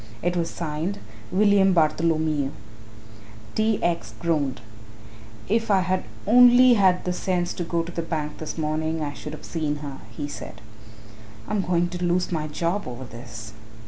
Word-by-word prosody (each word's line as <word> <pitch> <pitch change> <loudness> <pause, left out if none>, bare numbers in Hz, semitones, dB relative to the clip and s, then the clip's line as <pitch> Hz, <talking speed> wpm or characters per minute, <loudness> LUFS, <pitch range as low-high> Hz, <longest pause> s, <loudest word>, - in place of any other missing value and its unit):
It 175 +1 +1
was 170 -1 0
signed 165 +4 -3 0.3
"William 195 0 +4
Bartholomew." 155 -3 +2 1.0
T. 220 -1 +2
X. 170 -1 -1
groaned. 150 -6 0 0.9
"If 225 +2 +1
I 195 -2 +4
had 185 0 -1 0.2
only 245 +2 +7
had 190 -4 +3
the 180 - 0
sense 180 -1 -1
to 175 - -3
go 170 0 -1
to 170 - -7
the 170 - -3
bank 155 -2 -4
this 155 - -5
morning, 155 0 -1
I 145 -1 -3
should 125 +4 -8
have 155 - -9
seen 155 -3 -2
her," 140 -1 -7
he 145 +6 -5
said. - - -8 0.9
"I'm 210 - 0
going 175 -1 +1
to 180 0 -5
lose 175 +1 +1
my 155 -3 -1
job 170 +5 -2
over 125 +1 -6
this." 115 -2 -9
170 Hz, 160 wpm, -24 LUFS, 150-185 Hz, 1.0 s, only